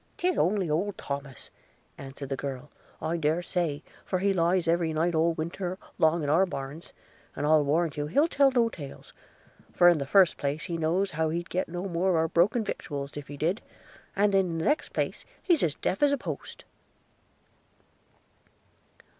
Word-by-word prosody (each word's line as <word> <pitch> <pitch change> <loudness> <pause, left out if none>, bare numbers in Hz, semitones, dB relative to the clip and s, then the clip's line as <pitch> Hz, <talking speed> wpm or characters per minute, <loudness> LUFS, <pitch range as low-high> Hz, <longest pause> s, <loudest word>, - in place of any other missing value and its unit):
''Tis 365 0 +1
only 190 -1 +1
old 180 +7 -1
Thomas,' 140 -2 -6 0.4
answered 135 0 -8
the 135 - -1
girl, 135 +1 -6 0.3
'I 160 +2 0
dare 160 +2 0
say; 165 -5 -2 0.2
for 185 - -1
he 195 +2 +1
lies 175 0 +2
every 165 -1 +1
night 165 +3 +1
all 165 +1 +2
winter 175 +3 -4 0.2
long 160 0 +3
in - - -2
our 175 +6 +4
barns; 140 +1 -7 0.4
and 145 - -2
I'll 155 0 +5
warrant 155 +2 0
you 145 0 -2
he'll 285 - +3
tell 280 -4 +4
no 245 -3 +3
tales 145 -11 -9 0.3
– - - -28
for 175 - +6
in 170 -3 +3
the 140 - -3
first 185 +2 +5
place 145 +2 -2
he 175 -3 -4
knows 170 +5 0
how 160 0 0
he'd 170 +2 -4
get 185 - -1
no 175 +3 -4
more 180 +1 0
of 180 - +3
our 160 0 +2
broken 205 +9 +2
victuals 140 -8 -5
if 145 -1 -7
he 145 - -8
did; 170 +9 0 0.5
and 200 0 +2
in 185 -4 +2
the 160 - -2
next 300 - +1
place - - -2 0.2
he's 345 -6 +3
as 155 -3 +1
deaf 190 - -2
as 290 -1 +5
a 285 - +2
post.' - - -7
170 Hz, 190 wpm, -28 LUFS, 150-190 Hz, 0.5 s, for